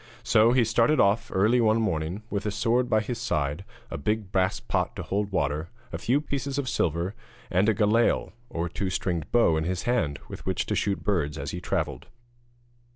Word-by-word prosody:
So 110 +2 +5
he 125 -1 +4
started 115 +6 +3
off 100 +3 +3
one - - -2
early 115 +5 +4
morning, 110 -5 +1
with 100 0 -2
a - - +2
sword 120 +4 +1
by 110 - +3
his 115 +2 -4
side, 75 - -1 0.3
a - - -4
big 105 +5 -1
brass 95 -1 +1
pot - - -1
to - - -5
hold 100 +1 -2
water, 75 -2 -1 0.2
a - - -3
few 130 +4 +2
pieces 140 -2 -3
of 140 -2 -1
silver, 85 - 0 0.4
and 95 +4 +3
a 110 - +2
galail 110 +2 +2 0.2
or 85 +1 -2
two 95 +3 -3
stringed 85 -4 -2
bow 115 -10 +4
in 80 - 0
his 90 0 -2
hand, 85 - 0
with - - -9
which - - -1
to - - -1
shoot 100 -5 -1
birds 75 -7 0
as 70 +1 -4
he 90 - -5
travelled. 80 -8 -2
100 Hz, 200 wpm, -27 LUFS, 85-115 Hz, 0.4 s, So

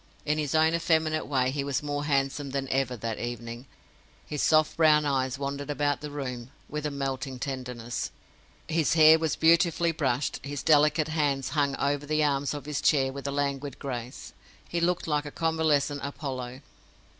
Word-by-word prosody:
In 150 +1 +1
his 150 0 -1
own 160 +1 +4
effeminate 160 -2 +1
way 130 -2 +1
he 140 0 -2
was 140 0 -2
more 145 0 -2
handsome 140 0 0
than 135 0 -2
ever 130 -2 0
that 115 0 -4
evening. 120 +1 -6 0.6
His 150 - -3
soft 155 -1 +3
brown 155 -2 +5
eyes 130 -2 0
wandered 140 +1 -4
about 145 -1 0
the 150 - -5
room 130 -4 -5 0.2
with 150 0 -3
a - - -2
melting 135 -2 -3
tenderness; 125 -3 -4 0.6
his 160 0 +1
hair 160 0 +8
was 160 -2 0
beautifully 170 +1 +3
brushed; 140 -4 -1
his 140 -1 -5
delicate 150 0 +4
hands 145 -4 0
hung 140 0 +1
over 145 +1 -1
the 155 +1 +1
arms 145 0 0
of 145 - -7
his 150 -2 -3
chair 135 -3 +3
with 140 0 -6
a - - -1
languid 140 -1 -2
grace. 125 -2 -6 0.3
He 170 - -2
looked 180 +1 +1
like 150 -1 0
a - - -7
convalescent 155 -3 +1
Apollo. 130 -3 -5
145 Hz, 175 wpm, -27 LUFS, 135-155 Hz, 0.6 s, hair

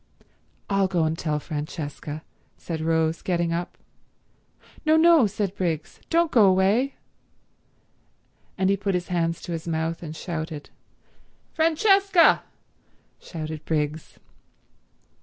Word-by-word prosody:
"I'll 195 -1 +2
go 180 -3 +1
and 160 0 0
tell 155 -2 -1
Francesca," 150 0 -6 0.3
said 160 -2 -5
Rose, 160 0 +1
getting 170 -2 0
up. 175 +1 -4 1.1
"No, 315 0 +4
no," 325 -7 +6
said 200 -1 -2
Briggs. 165 -5 -3
"Don't 335 -1 +2
go 220 -5 +6
away." 195 +8 +2 1.6
And 190 +1 +2
he 200 - +2
put 195 -1 -1
his 180 0 -3
hands 165 -2 -1
to 175 - -6
his 165 0 -5
mouth 165 0 -2
and 160 -2 -7
shouted. 160 -3 -5 0.8
"Francesca!" 385 +3 +4 0.8
shouted 155 -2 -7
Briggs. 150 0 -2
175 Hz, 115 wpm, -25 LUFS, 160-205 Hz, 1.6 s, no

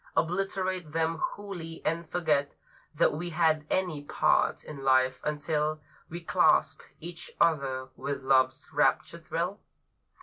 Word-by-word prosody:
Obliterate 185 -1 -1
them 165 0 0
wholly, 175 -6 -5
and 165 0 -1
forget 150 -5 +1 0.4
That - - +3
we 175 +4 -3
had 160 -2 +2
any 175 -6 0
part - - +2
in 150 - -8
life 130 -1 +3
until 150 +1 -1 0.3
We 170 +2 -6
clasped 165 - +3 0.2
each 170 +1 -6
other 135 -5 +1
with 140 -1 -4
Love's 130 -1 +2
rapture 170 - +1
thrill? 170 +5 -3
160 Hz, 125 wpm, -29 LUFS, 145-175 Hz, 0.4 s, That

